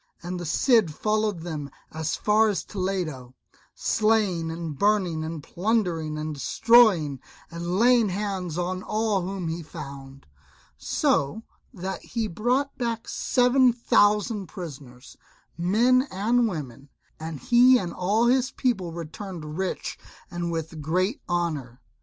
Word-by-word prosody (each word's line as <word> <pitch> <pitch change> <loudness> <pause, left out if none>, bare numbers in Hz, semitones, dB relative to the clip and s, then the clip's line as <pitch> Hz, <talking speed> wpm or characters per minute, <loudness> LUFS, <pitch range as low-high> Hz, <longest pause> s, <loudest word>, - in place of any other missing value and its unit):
And 180 +1 -4
the 175 - -5
Cid 225 - +3
followed 215 -3 0
them 155 -4 -5 0.2
as 160 0 -2
far 215 +1 +3
as 200 - -1
Toledo, 175 -10 -4 0.4
slaying 210 -7 +1
and 165 -2 -5
burning, 185 -3 +1
and 160 -2 -5
plundering 175 -6 -1
and 155 0 -3
destroying, 175 - +4 0.3
and 170 +2 -3
laying 235 -1 +4
hands 190 -4 -3
on 180 +1 -2
all 215 -1 0
whom 185 -1 -4
he 165 +1 -3
found, 140 -4 -10 0.5
so 140 +11 0 0.3
that 190 -4 -5
he 225 -2 -3
brought 250 +9 0
back 230 -2 -2
seven 250 0 +3
thousand 210 -3 +2
prisoners, 145 -8 -10 0.4
men 240 +10 +3
and 230 +5 +2
women; 140 - -6 0.3
and 160 -2 -6
he 250 - +6
and 180 -6 -4
all 205 +6 +1
his 255 +1 +3
people 220 -11 -1
returned 165 -1 -7
rich 190 +1 -3 0.3
and 175 -1 -3
with 160 -1 -4
great 185 - 0
honour. 155 -8 -2
185 Hz, 130 wpm, -25 LUFS, 160-220 Hz, 0.5 s, he